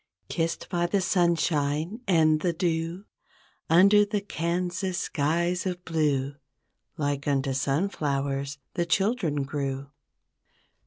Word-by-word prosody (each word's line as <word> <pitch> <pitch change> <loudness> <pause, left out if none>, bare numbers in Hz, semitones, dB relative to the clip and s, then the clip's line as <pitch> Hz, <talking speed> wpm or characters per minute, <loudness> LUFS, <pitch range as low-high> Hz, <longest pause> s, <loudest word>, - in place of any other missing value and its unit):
Kissed 165 -1 -2
by 175 -2 0
the 200 +3 +1
sunshine 170 - +1
and 155 -4 +4
the 170 +2 0
dew 165 +2 -2 0.6
Under 200 +5 +6
the 205 0 -1
Kansas 180 0 -2
skies 170 +4 0
of 180 -1 -4
blue 145 -4 0 0.6
Like 145 -2 -2
unto 135 -1 +1
sunflowers, 140 -2 -1 0.2
the 170 -1 -1
children 190 - +1
grew. 135 0 -4
165 Hz, 105 wpm, -27 LUFS, 145-180 Hz, 0.6 s, Under